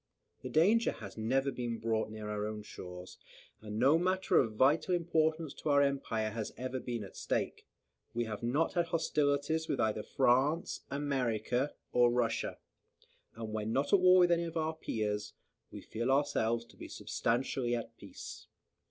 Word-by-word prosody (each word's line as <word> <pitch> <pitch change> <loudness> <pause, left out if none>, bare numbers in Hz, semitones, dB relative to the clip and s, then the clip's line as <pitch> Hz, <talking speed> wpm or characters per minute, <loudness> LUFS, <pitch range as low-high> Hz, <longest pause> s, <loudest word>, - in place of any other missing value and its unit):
The 130 - -6
danger 200 - +4
has - - -9
never 135 +5 +1
been 120 -3 -3
brought 110 -1 -1
near 110 -1 -7
our 105 0 -2
own 105 -1 -5
shores, 90 -2 -9 0.4
and 105 0 -6
no 140 +7 +5
matter 185 +2 +2
of 115 -4 +1
vital 150 - +3
importance 160 -2 0
to - - -4
our 140 0 +5
empire 115 -6 -1
has 110 -1 -4
ever 130 +2 -3
been 120 -3 -4
at 100 - -11
stake. - - -2 0.5
We 120 - +1
have 110 -2 -5
not 135 +8 +1
had 175 -2 +1
hostilities 155 0 +1
with 135 - -1
either 110 -1 +1
France, 135 +8 +1
America, 130 -2 -1 0.2
or 120 -1 +5
Russia; 120 -1 0 0.8
and 110 -1 -6
when 110 0 -2
not 140 +2 0
at 200 - +7
war 185 0 +7
with 175 -1 +5
any 170 0 +2
of 165 0 -5
our 160 0 0
peers, 105 -7 -3 0.4
we - - -9
feel 115 +3 -3
ourselves 120 -5 +1
to - - -20
be - - -8
substantially 120 0 -1
at 115 -1 -6
peace. - - -10
125 Hz, 170 wpm, -33 LUFS, 110-155 Hz, 0.8 s, at